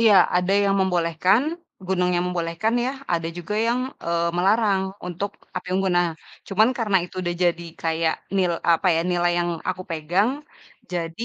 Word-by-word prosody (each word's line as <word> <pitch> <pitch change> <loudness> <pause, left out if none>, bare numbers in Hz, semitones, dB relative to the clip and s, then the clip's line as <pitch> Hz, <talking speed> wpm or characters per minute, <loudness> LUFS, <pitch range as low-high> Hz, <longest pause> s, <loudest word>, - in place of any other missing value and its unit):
Iya, 225 -3 +6 0.2
ada 180 +2 +1
yang 195 0 +2
membolehkan, 180 +3 +2 0.4
gunungnya 180 -1 +1
membolehkan 180 +5 -1
ya, 255 - 0 0.2
ada 165 -1 0
juga 175 +4 -4
yang, 240 +2 +1 0.2
eee, 170 0 +1
melarang 200 +1 +3 0.3
untuk 180 +3 -3 0.3
api - - -4
unggun. 190 -1 +1
Nah, 175 0 +3 0.4
cuman 215 +4 +4
karena 210 -4 +2
itu 180 - -12
udah 175 0 -1
jadi 170 0 +1 0.2
kayak 160 0 +1 0.2
nil 180 -2 +2 0.2
apa 165 +3 +1
ya, 165 - +2
nilai 175 0 +2
yang 175 0 0 0.2
aku 185 0 -2
pegang 170 +7 +1 0.6
jadi, 170 +4 -3
180 Hz, 160 wpm, -23 LUFS, 170-195 Hz, 0.6 s, Iya